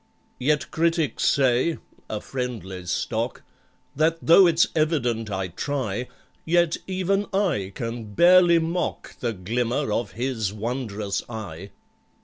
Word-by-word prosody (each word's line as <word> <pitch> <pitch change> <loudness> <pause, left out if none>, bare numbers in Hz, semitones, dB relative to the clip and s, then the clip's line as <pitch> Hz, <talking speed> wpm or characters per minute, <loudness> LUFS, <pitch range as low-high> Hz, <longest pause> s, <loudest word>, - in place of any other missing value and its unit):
Yet 150 +3 0
critics 165 -2 +1
say 135 +4 +3 0.3
(a 105 - -3
friendly 100 -9 -5
stock) - - -2 0.5
That, 160 +3 +2
though 170 +4 +7
it's 165 -1 +4
evident 125 -9 0
I 95 -2 -2
try, 125 - -3 0.4
Yet 170 0 +2
even 190 +2 0
I 170 - 0
can 115 -3 -5
barely 175 - +6
mock 165 +2 -3
The 120 - -1
glimmer 120 +7 -1
of 115 -2 -2
his 115 -4 -2
wondrous 110 -2 -3
eye! 100 -5 -7
125 Hz, 120 wpm, -24 LUFS, 110-165 Hz, 0.5 s, though